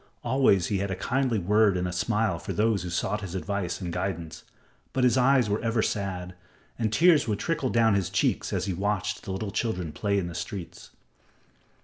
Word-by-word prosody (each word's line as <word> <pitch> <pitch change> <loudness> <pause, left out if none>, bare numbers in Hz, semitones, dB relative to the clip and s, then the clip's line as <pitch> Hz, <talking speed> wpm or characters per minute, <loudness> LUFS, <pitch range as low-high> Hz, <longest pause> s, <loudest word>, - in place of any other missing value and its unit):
Always 120 -8 +3
he 100 - -1
had 100 +1 -2
a 95 - -2
kindly 125 +4 0
word 105 +1 +3
and 90 0 -1
a - - -3
smile 105 -1 0
for - - -5
those 110 -1 +1
who 90 - -5
sought 95 +4 -1
his 95 -2 -6
advice 95 -2 -2
and 90 -3 -4
guidance, 85 -3 -4 0.5
but 130 - +1
his 125 0 +4
eyes 130 -2 +4
were 105 +1 -1
ever 115 -1 +1
sad, 90 -3 -3 0.5
and 110 -2 0
tears 160 +2 +5
would 105 -2 0
trickle 150 - -1
down 115 -2 +3
his 95 -3 0
cheeks 100 +1 0
as - - -1
he 95 - -2
watched 105 +2 -1
the 95 - -6
little 100 +2 -3
children 90 -8 -2
at - - -10
play 100 -1 0
in 95 - 0
the 85 - -6
streets. 85 +1 -7
100 Hz, 210 wpm, -27 LUFS, 90-115 Hz, 0.5 s, tears